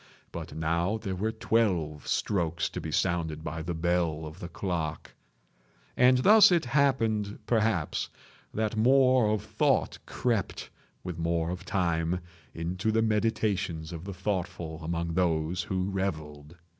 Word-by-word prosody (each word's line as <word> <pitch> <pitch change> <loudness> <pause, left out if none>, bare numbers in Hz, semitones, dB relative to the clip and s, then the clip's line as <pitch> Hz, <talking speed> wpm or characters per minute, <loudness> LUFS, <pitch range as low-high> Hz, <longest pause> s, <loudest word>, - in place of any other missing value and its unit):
But - - -7
now 85 +6 0
there 100 -4 -4
were 105 +4 -1
twelve 90 -10 0
strokes 85 -4 0
to - - -6
be - - -5
sounded 80 -3 0
by 80 0 -4
the 85 +1 -3
bell 85 -2 0
of 80 +3 -9
the 85 - -6
clock; 85 -4 -3 0.8
and 125 +1 +5
thus 210 +10 +7
it 170 -5 +3
happened, 115 -6 +1
perhaps, 110 -8 0 0.4
that 110 0 -1
more 130 0 +4
of 105 -2 0
thought - - +1
crept, 115 -6 -2 0.3
with 90 -2 -5
more 85 0 0
of 90 +1 -6
time, 85 -2 0 0.4
into 90 +6 -1
the 115 +1 +2
meditations 105 -7 0
of 80 -1 -7
the 100 - -5
thoughtful 90 -4 -3
among 85 +1 -2
those 85 0 +1
who 95 +1 -2
revelled. 80 -5 -4
90 Hz, 140 wpm, -28 LUFS, 80-110 Hz, 0.8 s, thus